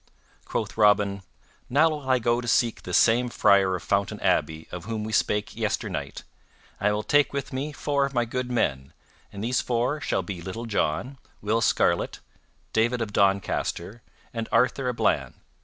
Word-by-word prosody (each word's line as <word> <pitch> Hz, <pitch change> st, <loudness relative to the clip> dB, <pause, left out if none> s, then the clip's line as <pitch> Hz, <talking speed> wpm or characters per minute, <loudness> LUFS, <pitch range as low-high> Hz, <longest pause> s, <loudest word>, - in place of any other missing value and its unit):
Quoth -, -, -3 dB
Robin, 105 Hz, -2 st, +3 dB, 0.5 s
"Now 150 Hz, +6 st, +4 dB
will 145 Hz, -3 st, -5 dB
I 130 Hz, -, +5 dB
go 120 Hz, 0 st, +1 dB
to 120 Hz, -, -7 dB
seek 115 Hz, 0 st, +2 dB
this 90 Hz, -, 0 dB
same 120 Hz, +2 st, +4 dB
Friar 100 Hz, -4 st, +4 dB
of 90 Hz, -, -6 dB
Fountain 100 Hz, 0 st, 0 dB
Abbey 80 Hz, 0 st, 0 dB
of 90 Hz, -1 st, -7 dB
whom 110 Hz, -2 st, -3 dB
we 110 Hz, 0 st, -5 dB
spake 105 Hz, -1 st, 0 dB
yesternight, -, -, -3 dB, 0.6 s
and 100 Hz, -, +1 dB
I -, -, +3 dB
will 105 Hz, +1 st, -1 dB
take 145 Hz, +3 st, +3 dB
with 140 Hz, -2 st, -4 dB
me 140 Hz, +4 st, -3 dB
four 145 Hz, -1 st, 0 dB
of 140 Hz, -, -1 dB
my 120 Hz, -1 st, +2 dB
good 125 Hz, +1 st, -3 dB
men, 65 Hz, -, -1 dB, 0.4 s
and 100 Hz, +1 st, -7 dB
these 125 Hz, +2 st, +1 dB
four 125 Hz, +5 st, -1 dB
shall 95 Hz, -, -1 dB
be 90 Hz, -1 st, -6 dB
Little 105 Hz, +7 st, -6 dB
John, 115 Hz, -, -1 dB, 0.2 s
Will 110 Hz, +2 st, 0 dB
Scarlet, 115 Hz, -, +1 dB, 0.6 s
David 120 Hz, +2 st, +2 dB
of 110 Hz, -3 st, -3 dB
Doncaster, 100 Hz, +1 st, 0 dB, 0.3 s
and 115 Hz, -1 st, -4 dB
Arthur 125 Hz, +1 st, +2 dB
a -, -, -1 dB
Bland. -, -, 0 dB
115 Hz, 175 wpm, -26 LUFS, 100-125 Hz, 0.6 s, I